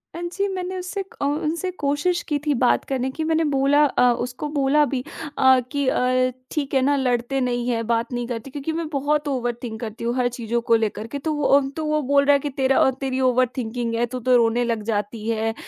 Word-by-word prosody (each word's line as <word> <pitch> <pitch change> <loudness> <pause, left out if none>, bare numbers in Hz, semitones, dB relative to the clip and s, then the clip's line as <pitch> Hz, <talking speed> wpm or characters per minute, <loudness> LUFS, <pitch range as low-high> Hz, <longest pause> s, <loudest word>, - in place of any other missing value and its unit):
हाँ 340 - -5
जी। 400 +2 0
मैंने 370 0 -4
उससे 370 +2 -4 0.2
अ, - - +1
उनसे 310 +5 -1
कोशिश 290 +5 +1
की 295 - +1
थी 295 - +2
बात 250 - +3
करने 260 -1 -1
की, 315 - -4
मैंने 320 +1 +1
बोला 280 +2 +4
अ, 250 -3 +3
उसको 250 +4 -5
बोला 290 0 +3
भी 260 -2 -3 0.3
अ, 260 -1 +6
कि 285 -2 -1
अ, 255 0 +2 0.2
ठीक 285 -3 -3
है 265 - +3
ना, 285 +2 +3
लड़ते 250 +1 0
नहीं 245 -1 -1
हैं, 230 -1 -1
बात 235 +1 0
नहीं 240 0 -2
करते, 240 +1 -5
क्योंकि 290 +3 -4
मैं 325 0 -3
बहुत 295 +1 0
ओवरथिंक 240 -4 -3
करती 225 -1 -6
हूँ, 235 +1 -1
हर 250 -1 +2
चीज़ों 235 -1 -2
को 230 0 +3
लेकर 220 -1 -1
के, 285 +5 -5
तो 310 +2 -2
वो 295 -1 -2
अम, 270 -1 0
तो 310 +3 -5
वो 305 0 +1
बोल 280 +1 +3
रहा 285 - +5
है 280 - +4
कि 290 - -3
"तेरा 265 0 +1
अ, - - +5
तेरी 265 -1 -1
ओवर 255 +1 +3
थिंकिंग 235 -1 -3
है, 235 +1 +1
तू 250 +2 -6
तो 250 +1 +3
रोने 235 0 +3
लग 230 -3 -1
जाती 210 0 -3
है, 225 0 0
260 Hz, 235 wpm, -23 LUFS, 240-290 Hz, 0.3 s, अ